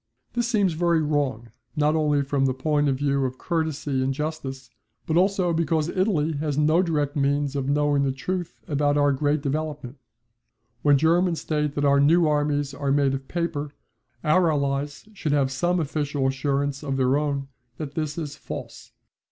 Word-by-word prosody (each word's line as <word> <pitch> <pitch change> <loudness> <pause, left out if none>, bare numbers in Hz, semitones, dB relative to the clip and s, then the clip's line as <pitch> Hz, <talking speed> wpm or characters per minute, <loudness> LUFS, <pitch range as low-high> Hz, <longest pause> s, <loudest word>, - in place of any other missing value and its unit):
This 240 -1 0
seems 205 -7 +2
very 170 0 +2
wrong 135 -7 -1 0.2
not 150 0 +2
only 150 -2 +2
from 135 0 0
the 130 - -1
point 145 +1 +1
of 135 - +1
view 140 0 0
of 130 0 -3
courtesy 155 -5 -1
and 130 +1 0
justice, 135 -4 -5 0.3
but 155 - -1
also 185 -1 +2
because 160 -1 0
Italy 180 -5 +1
has 145 -1 -2
no 155 +3 +4
direct 150 -4 -1
means 145 0 0
of 135 -1 -1
knowing 145 0 +2
the 135 -1 +1
truth 175 +6 -4
about 145 0 +1
our 145 0 +4
great 145 +1 0
development. 145 -3 -3 0.8
When 145 -1 +5
Germans 165 +3 +2
state 150 -2 -1
that 145 - 0
our 140 0 +4
new 165 +4 +5
armies 145 -1 0
are 140 0 -2
made 140 -1 +2
of 135 0 -5
paper, 150 -4 -3 0.5
our 165 +2 +3
Allies 140 +3 -2
should 155 -7 -2
have 135 -2 +2
some 175 +7 0
official 145 -2 -1
assurance 140 +1 -1
of 135 -2 -2
their 130 0 +2
own 140 -2 -1 0.3
that 150 -3 -6
this 155 -1 -3
is 150 -3 -4
false. - - -9
145 Hz, 175 wpm, -24 LUFS, 140-160 Hz, 0.8 s, When